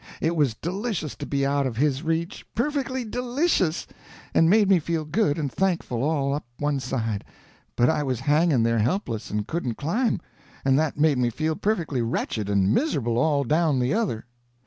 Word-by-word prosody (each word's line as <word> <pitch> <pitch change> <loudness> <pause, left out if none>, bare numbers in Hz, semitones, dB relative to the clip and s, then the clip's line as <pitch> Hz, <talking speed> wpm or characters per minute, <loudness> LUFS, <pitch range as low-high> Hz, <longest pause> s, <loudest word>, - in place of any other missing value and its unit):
It 165 +2 0
was 140 -8 +2
delicious 185 - -3
to - - -6
be 140 -1 0
out 140 0 +1
of 115 -3 -5
his 140 0 +1
reach, 165 +2 -2
perfectly 260 0 -1
delicious, 245 - 0 0.5
and 165 - +5
made 210 +1 +5
me 190 -2 +5
feel 160 0 -2
good 155 -2 +1
and 145 -4 -2
thankful 175 -11 0
all 140 -1 +1
up 145 - -2
one 145 -1 0
side; 115 -5 -2 0.5
but 120 - +4
I 160 -1 +2
was 130 -4 -2
hanging 145 -2 +3
there 115 0 +2
helpless 120 - -1
and 105 0 -2
couldn't 130 -7 -3
climb, 220 - 0 0.5
and 135 +1 +4
that 155 -2 0
made 145 -3 +3
me 120 -1 +2
feel 155 +6 -1
perfectly 170 - -1
wretched 115 -2 -2
and 100 0 +3
miserable 120 - +1
all 145 0 +2
down 155 +1 +2
the 125 +2 +1
other. 195 - -1
150 Hz, 180 wpm, -25 LUFS, 125-175 Hz, 0.5 s, and